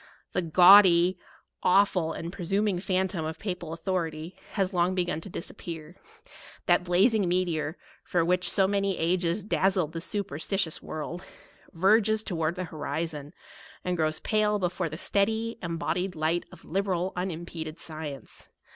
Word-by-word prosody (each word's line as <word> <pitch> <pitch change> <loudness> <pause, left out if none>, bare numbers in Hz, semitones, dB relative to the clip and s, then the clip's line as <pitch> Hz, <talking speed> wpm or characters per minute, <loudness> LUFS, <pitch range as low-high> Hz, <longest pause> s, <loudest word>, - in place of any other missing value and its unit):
The - - +1
gaudy, 180 +1 +7 0.4
awful, 180 -3 +3
and 170 +2 -6
presuming 195 +1 0
phantom 185 -2 -1
of 160 +1 -4
Papal 180 -5 -5
au - - -3
thority, 165 -1 -3 0.2
has 195 -1 0
long 180 +1 +2
begun 175 -3 -1
to 200 - -9
disappear: 165 -2 -6 0.7
that - - +3
blazing 195 +3 +3
meteor, 175 -3 0 0.3
which 180 +1 +2
for - - 0
so 195 -2 +3
many 200 -1 0
ages 175 +3 0
daz 195 -1 +1
zled 165 -5 0
the 165 0 -5
superstitious 185 -2 -2
world, 165 +4 -6 0.5
verges 215 +4 +3
towards 165 -3 -1
the 185 - -3
horizon, 150 -2 -4 0.5
and 180 0 0
grows 155 -2 0
pale 210 -1 +2
before 180 -2 -1
the 155 - -6
stea 200 +3 +2
dy, 225 +2 -3
embodied 175 +2 -2
light 160 +2 0
of - - -14
liberal, 190 0 -1
unimpeded 170 -3 -5
sci 160 -1 -6
ence. 140 -2 -10
180 Hz, 145 wpm, -28 LUFS, 165-195 Hz, 0.7 s, gaudy